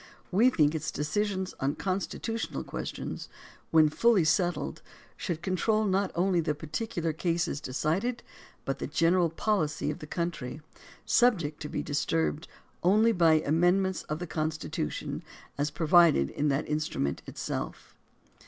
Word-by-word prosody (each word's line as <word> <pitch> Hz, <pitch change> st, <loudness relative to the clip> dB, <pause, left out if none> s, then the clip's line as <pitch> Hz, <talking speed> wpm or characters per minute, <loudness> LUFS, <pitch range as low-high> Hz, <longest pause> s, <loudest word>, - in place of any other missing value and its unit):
We 220 Hz, +7 st, +5 dB
t,hink 150 Hz, -10 st, +3 dB
its 160 Hz, -, -2 dB
decisions 190 Hz, +5 st, -1 dB
on 135 Hz, +2 st, 0 dB
constitutional 200 Hz, +4 st, -3 dB
questions, -, -, -5 dB, 0.4 s
when 160 Hz, -1 st, +6 dB
fully 215 Hz, +3 st, +4 dB
settled, 160 Hz, -1 st, 0 dB, 0.3 s
should 170 Hz, -1 st, -4 dB
control 215 Hz, +4 st, +1 dB
not 195 Hz, 0 st, +1 dB
only 180 Hz, +1 st, +2 dB
the 155 Hz, -2 st, 0 dB
particular 165 Hz, +2 st, -3 dB
cases 165 Hz, -2 st, -1 dB
de 130 Hz, -, -6 dB
cided, 190 Hz, -, -1 dB, 0.4 s
but -, -, -2 dB
the -, -, -3 dB
general 170 Hz, 0 st, +3 dB
policy 160 Hz, -5 st, 0 dB
of 150 Hz, -, -7 dB
the 150 Hz, -, -8 dB
country, 160 Hz, -5 st, -4 dB, 0.4 s
subject 215 Hz, -10 st, +2 dB
to 150 Hz, -, -5 dB
he -, -, -3 dB
disturbed 155 Hz, +1 st, -1 dB, 0.3 s
only 215 Hz, +6 st, +4 dB
by 165 Hz, -6 st, +4 dB
amendments 175 Hz, +5 st, +2 dB
of 150 Hz, -, -1 dB
the 175 Hz, -, -5 dB
Constitution 155 Hz, -, -3 dB, 0.3 s
as 145 Hz, +1 st, 0 dB
provided 165 Hz, -, +4 dB
in 150 Hz, -, -1 dB
that 140 Hz, 0 st, +1 dB
in 150 Hz, 0 st, 0 dB
strument 70 Hz, -, -2 dB
itself. -, -, -5 dB
165 Hz, 140 wpm, -29 LUFS, 150-190 Hz, 0.4 s, when